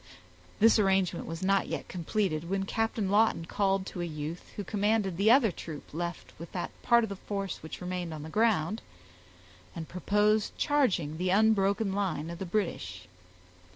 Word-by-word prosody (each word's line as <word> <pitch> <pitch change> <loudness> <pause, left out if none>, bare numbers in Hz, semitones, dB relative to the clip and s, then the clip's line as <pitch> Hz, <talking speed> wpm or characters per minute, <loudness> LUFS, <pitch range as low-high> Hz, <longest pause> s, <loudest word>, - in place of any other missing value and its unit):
This 225 +1 +6
arrangement 190 -3 +1
was 165 +2 -5
not 195 +1 +2
yet - - -4
completed, 175 -2 -2
when 195 0 0
Captain 225 -2 -1
Lawton 210 -5 +3
called 195 +1 0
to 180 - -5
a - - -1
youth, 155 0 -6
who 205 - -4
commanded 205 -1 +1
the 200 +5 +3
other 240 -4 +6
troop 160 -4 -9
left 170 +2 -5
with 170 - -8
that 180 - -3
part 235 -1 +4
of 220 - -2
the 200 - -4
force 195 0 -4
which 160 - -8
remained 180 -1 -3
on 155 -2 -6
the 160 - -7
ground, 215 -1 +1 0.9
and 160 -2 -5
proposed 210 +3 +1
charging 185 - +1
the 180 +1 0
unbroken 200 0 +3
line 175 -5 -1
of 170 - -7
the 190 - -4
British. 95 - -3
190 Hz, 170 wpm, -30 LUFS, 170-210 Hz, 0.9 s, This